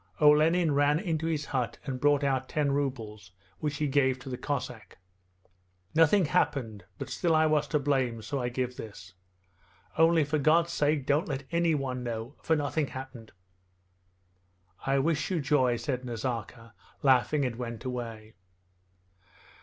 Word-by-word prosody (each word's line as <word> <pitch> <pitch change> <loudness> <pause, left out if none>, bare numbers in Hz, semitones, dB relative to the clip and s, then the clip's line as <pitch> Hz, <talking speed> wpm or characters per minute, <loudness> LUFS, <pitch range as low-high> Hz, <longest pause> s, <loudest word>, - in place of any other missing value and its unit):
Olenin 155 +3 +5
ran 145 +1 +3
into 165 -4 -2
his 155 -3 -1
hut 125 -4 -2
and 130 -2 -4
brought 145 0 +3
out 130 -2 0
ten 145 -2 0
rubles, 110 -9 -3 0.3
which 150 -1 -2
he 150 - 0
gave 135 -2 +2
to 130 - -10
the 125 - -4
Cossack. 125 -5 -5 1.0
'Nothing 165 +4 +4
happened, 115 - -1
but - - -5
still 170 -3 0
I 155 0 +4
was 150 -1 +2
to 150 - +1
blame, 130 -5 0
so 140 +5 -3
I 120 - -1
give 125 0 -3
this! 100 -4 -10 0.9
Only 165 -1 +5
for 150 +1 -1
God's 165 +4 +3
sake 145 -3 +1
don't 150 +8 +1
let 135 -1 -3
anyone 150 -7 0
know, 115 +2 -5
for 160 - +2
nothing 145 0 -1
happened...' 130 -4 -9 1.6
'I 135 0 +3
wish 150 +2 0
you 180 -3 0
joy,' 135 -4 +2
said 130 -1 -3
Nazarka 115 -1 -5 0.3
laughing, 135 +2 +3
and 120 -2 -3
went 115 -1 -6
away. 115 -4 -6
140 Hz, 150 wpm, -29 LUFS, 125-150 Hz, 1.6 s, Olenin